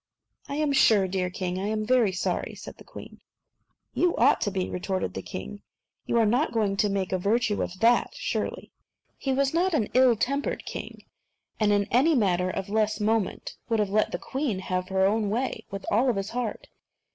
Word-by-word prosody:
"I 280 - -3
am 300 -1 +1
sure, 210 -7 +5
dear 185 -1 -1
king, 180 0 -3
I 195 - -2
am 215 0 -1
very 240 -4 +3
sorry," 185 - -2
said - - -10
the - - -14
queen. - - -12 0.7
"So - - -3
you 355 -1 +3
ought 265 +5 +4
to - - +1
be," 190 -2 -2
retorted 180 - -3
the - - -5
king; 65 +1 -7 0.5
"you - - +1
are 230 - +4
not 245 +8 +1
going 210 -4 +1
to 205 - +2
make 195 -2 -2
a 185 - 0
virtue 210 +2 +1
of 185 - -4
that, 235 +1 +4
surely." - - -3 0.3
But - - -43
he 270 - -1
was 275 +1 +1
not 350 +1 +2
an 220 -8 0
ill 255 -1 +5
tempered 275 +6 -2
king, - - -7 0.6
and 210 -2 +3
in 205 0 +2
any 285 +7 +4
matter 185 -6 +2
of 190 +1 -4
less 215 +1 0
moment 215 -1 -1
would 225 - +2
have 210 -2 0
let 215 +1 +2
the - - -2
queen 260 +2 -3
have 185 0 -3
her 190 0 +2
own 210 +1 +1
way 245 +5 -2
with 195 0 -6
all 245 +5 +3
his 195 0 -4
heart. 240 -2 -4
215 Hz, 205 wpm, -26 LUFS, 190-245 Hz, 0.7 s, sure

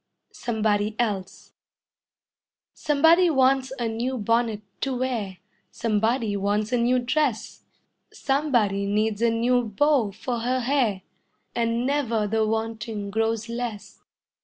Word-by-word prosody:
SOMEBODY 215 -2 -1
ELSE 200 -6 -3 1.2
Somebody 325 +5 +4
wants 265 -2 +2
a 235 - -1
new 240 +4 -2
bonnet 230 0 0 0.2
to 270 -2 -1
wear; 230 -7 -2 0.3
Somebody 225 0 0
wants 205 +2 -1
a 250 - +2
new 240 +2 +2
dress; 245 -1 -1 0.5
Somebody 240 -9 0
needs 210 +1 0
a 235 - +4
new 240 +2 +2
bow 240 +2 +2
for 235 +4 -4
her 250 +2 0
hair, 240 -7 0 0.5
And 230 +1 0
never 250 -6 0
the 220 +1 0
wanting 220 -2 -3
grows 225 +1 -1
less. 235 -3 -6
230 Hz, 115 wpm, -25 LUFS, 215-255 Hz, 1.2 s, Somebody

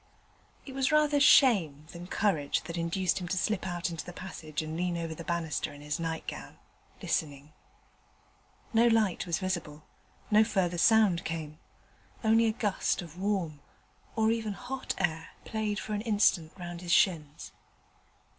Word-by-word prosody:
It 270 - -8
was 265 +1 +1
rather 300 -1 +4
shame 195 - +5
than 175 +1 -9
courage 180 -8 0
that 170 +1 -6
induced 170 +2 0
him 175 - -4
to 185 - -1
slip 190 +1 0
out 175 -1 -2
into 165 -3 -5
the 180 - -8
passage 160 -4 -6
and 155 0 -5
lean 175 0 -1
over 165 -1 -3
the 170 - -8
banister 170 -2 -2
in 145 - -12
his 150 +2 -3
nightgown, 165 -1 -5 0.5
listening. 145 -1 -2 1.2
No 230 +1 +5
light 220 -6 +2
was 170 - 0
visible; 170 -5 -4 0.5
no 215 +1 +7
further 185 -5 0
sound 210 -4 +4
came: 155 -2 -5 0.6
only 225 +1 +4
a - - +3
gust 205 -4 -1
of 170 +1 -12
warm, 190 -7 -1 0.6
or 220 0 +3
even 225 -2 -1
hot 255 +4 -5
air 165 -3 -2
played 215 -2 -2
for 215 - -5
an 205 - -1
instant 205 -7 +2
round 175 -1 -7
his 175 -1 -4
shins. 155 -5 +1
180 Hz, 155 wpm, -30 LUFS, 160-215 Hz, 1.2 s, no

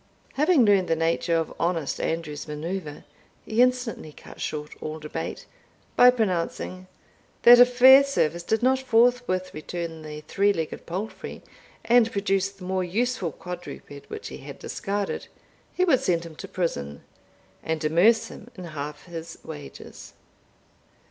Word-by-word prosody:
Having 300 -2 +4
learned 200 -3 +4
the 165 - +2
nature 165 +1 0
of 165 - -2
honest 165 -4 -1
Andrew's 160 -3 -3
manoeuvre 155 +1 -5 0.4
he 220 +2 +1
instantly 250 -10 0
cut - - -13
short 150 0 -4
all 155 0 -5
debate, 155 +1 -6 0.5
by 250 - +8
pronouncing, 185 -4 -2 0.6
that 240 0 +9
if 245 0 +6
Fairservice 260 - +6
did 220 +6 -1
not 260 +1 +3
forthwith 240 -6 +2
return 165 +1 -6
the 150 -1 -8
three 200 +6 +1
legged 160 -4 -5
palfrey, 190 +6 -6 0.4
and 230 -1 +4
produce 195 -1 0
the 195 -1 -15
more 185 0 -1
useful 205 -1 -1
quadruped 175 -4 -9
which 435 - -7
he - - -8
had - - -10
discarded, 200 0 -4 0.4
he 365 - +1
would 280 -8 +4
send 170 -1 0
him 165 -2 -10
to - - -7
prison, 70 - -3 0.6
and 160 -1 -3
amerce 180 +9 +4
him - - -12
in 185 - -9
half 150 -2 -7
his 170 -1 -8
wages. 150 -3 -10
185 Hz, 140 wpm, -25 LUFS, 160-230 Hz, 0.6 s, that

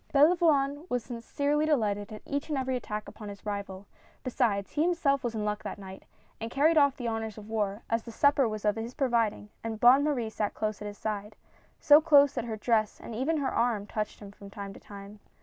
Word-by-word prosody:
Belavoine 295 -1 +3
was 245 -2 -1
sincerely 285 +5 -1
delighted 210 -8 0
at 215 - -9
each 285 +2 -3
and 295 - -1
every 260 -1 -1
attack 215 -4 -5
upon 210 -3 -9
his 200 +1 -11
rival 200 -2 -5 0.2
— - - -31
besides, 230 -6 0
he 295 - -1
himself 320 -5 +2
was 235 -2 -2
in 210 -1 -2
luck 210 0 -2
that - - -6
night, 190 -1 -10 0.3
and 225 - -4
carried 295 +6 +3
off 280 -3 +4
the 245 - -4
honors 225 -1 -3
of 210 -1 -10
war, 210 -1 -2
as 230 0 0
the 230 - -10
supper 280 +1 +3
was 215 -1 -5
of 210 +1 +2
his 230 +3 -5
providing 230 -6 0
and 225 -1 -4
Bonne 255 +4 +7
Marie 250 -7 -1
sat 210 -1 -2
close 215 -1 -3
at 210 - -5
his 205 0 -8
side 210 -1 -4 0.3
— - - -35
so 295 +1 +9
close 285 -3 +6
that - - -3
her 220 -2 -4
dress 215 -1 +1
and - - -8
even 270 +8 0
her 280 -3 -1
arm 230 -4 +1
touched 210 0 -4
him 200 -1 -9
from 200 0 -13
time 200 -1 -7
to - - -12
time. 200 +1 -11
225 Hz, 230 wpm, -29 LUFS, 210-280 Hz, 0.3 s, so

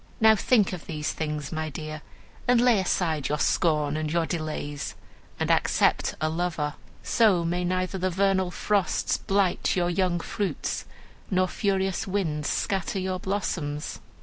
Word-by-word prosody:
Now 220 0 +7
think 210 -2 +3
of 175 - -7
these 150 -2 -2
things, 150 -2 -3
my 160 -1 -2
dear, 155 +1 -6 0.5
and 245 -1 +5
lay 240 -3 +5
aside 160 -6 0
your 150 - +1
scorn 150 -1 +2
and 155 -1 -2
your 170 0 +2
delays, 155 -3 -4 0.4
and - - +1
accept - - +2
a 155 - +1
lover. 160 -2 -1 0.3
So 195 -7 +3
may 175 +2 0
neither 185 +1 -1
the 185 +1 +1
vernal 190 0 +2
frosts 200 +1 0
blight 195 -2 +1
your 175 -1 +1
young 175 -1 +1
fruits, 200 +3 -3 0.4
nor 185 -1 +2
furious 195 +1 0
winds 160 -7 -1
scatter 195 0 -1
your 185 -1 -2
blossoms!" 170 -7 -3
180 Hz, 150 wpm, -26 LUFS, 155-195 Hz, 0.5 s, Now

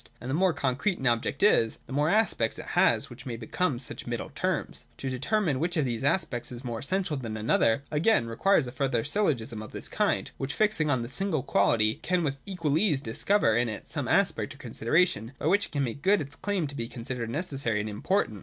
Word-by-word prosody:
And 125 +3 -5
the - - 0
more 185 +4 +3
concrete 145 +6 0
an 135 - -6
object 120 +3 +1
is, 115 - +4
the - - -9
more 145 +3 +2
aspects 200 - +1
it - - -7
has, - - +3
which 130 - -10
may 115 -2 -4
become 130 +5 -1
such 125 -1 -4
middle - - -4
terms. - - -3
To 135 - -4
determine 145 - 0
which 170 +3 -1
of 150 - +2
these 120 -1 -2
aspects 135 -6 0
is 120 +1 -8
more 120 -3 -4
essential 180 - -1
than 115 -4 -5
another, 115 +3 +2
again, 155 - +3
requires 130 +9 +2
a 125 - -6
further 130 -3 0
syllogism 135 - 0
of 110 - -10
this - - -5
kind, - - 0
which 135 +2 -3
fixing 210 -8 +2
on 130 -4 +1
the - - -5
single 155 +1 -1
quality 110 +1 +2
can 180 0 +1
with 140 -2 -2
equal 165 -6 0
ease 165 -9 +2
discover 115 - +1
in 120 0 +2
it 110 - -6
some - - -1
aspect - - +1
or - - -17
consideration 120 -3 +1
by - - -6
which 200 +5 +3
it - - -23
can 145 -3 0
make 125 +2 -4
good 200 +5 +4
its 145 0 -6
claims 190 -4 -2
to 140 - -9
be 115 -3 -3
considered 120 -1 -5
necessary 135 - -1
and 105 - -2
im 105 -1 -6
portant. 185 - 0
135 Hz, 225 wpm, -28 LUFS, 115-175 Hz, -, is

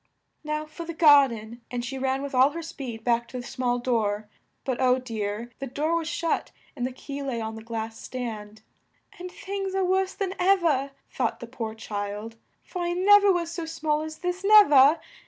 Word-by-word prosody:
"Now 305 0 -2
for 310 +2 -8
the 335 0 -6
gar 290 -4 +7
den," 230 0 -8
and 245 -1 -3
she 265 +1 -5
ran 265 +1 0
with 280 - -5
all 260 +2 +5
her 335 0 -5
speed 245 -8 -7
back 235 0 +1
to 255 - -7
the 245 - -8
small 245 -1 -1
door; 215 -4 -1 0.4
but, 260 -1 -2
oh 255 0 +4
dear! 225 -2 -4
the 275 - -4
door 300 +6 -1
was 330 -1 -1
shut, 335 -1 -1 0.3
and 250 -2 -1
the - - -6
key 280 +2 -7
lay 265 -4 -3
on 220 0 -4
the 220 - -8
glass 225 0 -5
stand, 220 -4 -6 0.6
"and 365 +1 -6
things 390 0 -4
are 385 -1 +2
worse 380 +1 +1
than 385 -2 -2
ev 380 0 +4
er," 280 -4 +2 0.2
thought 240 -3 -1
the - - -7
poor 230 -2 -5
child, 210 +1 -5 0.3
"for 360 - -6
I 345 0 0
nev 410 +3 +6
er 400 - +6
was 340 -2 -1
so 335 -1 -5
small 305 -2 -1
as 315 0 -6
this, 360 +1 -2
nev 415 -5 +7
er! 280 +3 +7
270 Hz, 210 wpm, -26 LUFS, 235-335 Hz, 0.6 s, gar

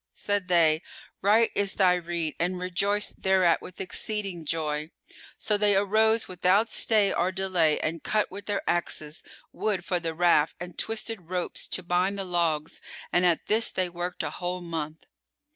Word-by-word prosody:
Said 205 -2 -1
they, 165 -3 +4 0.4
"Right 220 +3 +4
is 200 -1 +2
thy 185 -2 +5
rede," 170 -3 -2
and 180 +2 0
rejoiced 195 +3 -2
thereat 190 -3 +3
with 185 - -11
exceeding 195 -3 -3
joy. 150 -1 -2 0.5
So 210 -1 +1
they 205 -1 +3
arose 220 +3 +3
without 185 +5 +2
stay 210 -3 +2
or 180 +2 +1
delay 185 -5 +1
and 160 0 -2
cut 215 -1 0
with 200 +2 -9
their 205 -1 -2
axes 155 -3 -1 0.3
wood 195 -5 -2
for 180 - 0
the 165 -1 -4
raft 170 -3 +3
and 175 -1 -8
twisted 220 -5 -3
ropes 180 -1 -2
to 185 - -1
bind 180 +3 +1
the 195 - -3
logs 165 -4 -1 0.3
and 180 0 +4
at 170 -2 +1
this 225 +2 +3
they 185 -1 -1
worked 175 +1 -4
a - - -3
whole 180 0 -4
month. 160 -2 -5
180 Hz, 165 wpm, -27 LUFS, 170-200 Hz, 0.5 s, thy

